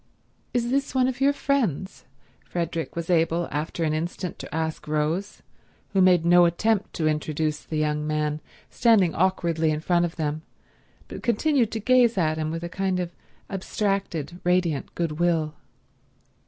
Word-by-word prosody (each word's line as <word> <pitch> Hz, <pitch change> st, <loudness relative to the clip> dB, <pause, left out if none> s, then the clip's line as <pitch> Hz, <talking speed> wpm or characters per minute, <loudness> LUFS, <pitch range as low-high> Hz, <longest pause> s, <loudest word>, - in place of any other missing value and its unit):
"Is 240 Hz, 0 st, 0 dB
this 275 Hz, 0 st, 0 dB
one 255 Hz, -1 st, +4 dB
of 260 Hz, 0 st, -3 dB
your 275 Hz, +1 st, +5 dB
friends?" 240 Hz, -, -1 dB, 0.4 s
Frederick 165 Hz, -2 st, -3 dB
was 170 Hz, +1 st, -3 dB
able 165 Hz, 0 st, +2 dB
after 155 Hz, +3 st, -2 dB
an 155 Hz, -1 st, +1 dB
instant 170 Hz, +3 st, -4 dB
to -, -, -8 dB
ask 160 Hz, -1 st, -3 dB
Rose, 155 Hz, +6 st, -1 dB, 0.5 s
who 195 Hz, -, +4 dB
made 180 Hz, -3 st, +5 dB
no 175 Hz, 0 st, +6 dB
attempt 205 Hz, +5 st, +1 dB
to 160 Hz, -3 st, 0 dB
introduce 155 Hz, 0 st, -1 dB
the 155 Hz, -, -5 dB
young 150 Hz, 0 st, 0 dB
man 150 Hz, 0 st, -1 dB, 0.3 s
standing 205 Hz, -8 st, +4 dB
awkwardly 170 Hz, -3 st, +1 dB
in 150 Hz, 0 st, 0 dB
front 175 Hz, +2 st, +2 dB
of 170 Hz, -, -5 dB
them 155 Hz, -1 st, -2 dB, 0.7 s
but -, -, -8 dB
continued 240 Hz, 0 st, +2 dB
to 225 Hz, -, -2 dB
gaze 245 Hz, 0 st, +4 dB
at 155 Hz, -3 st, +1 dB
him 155 Hz, 0 st, -1 dB
with 165 Hz, +1 st, -4 dB
a -, -, -2 dB
kind 190 Hz, +1 st, -1 dB
of 175 Hz, -1 st, -3 dB, 0.4 s
abstracted, 190 Hz, -4 st, -2 dB
radiant 175 Hz, -5 st, 0 dB
goodwill. 165 Hz, -1 st, 0 dB
170 Hz, 155 wpm, -25 LUFS, 155-195 Hz, 0.7 s, no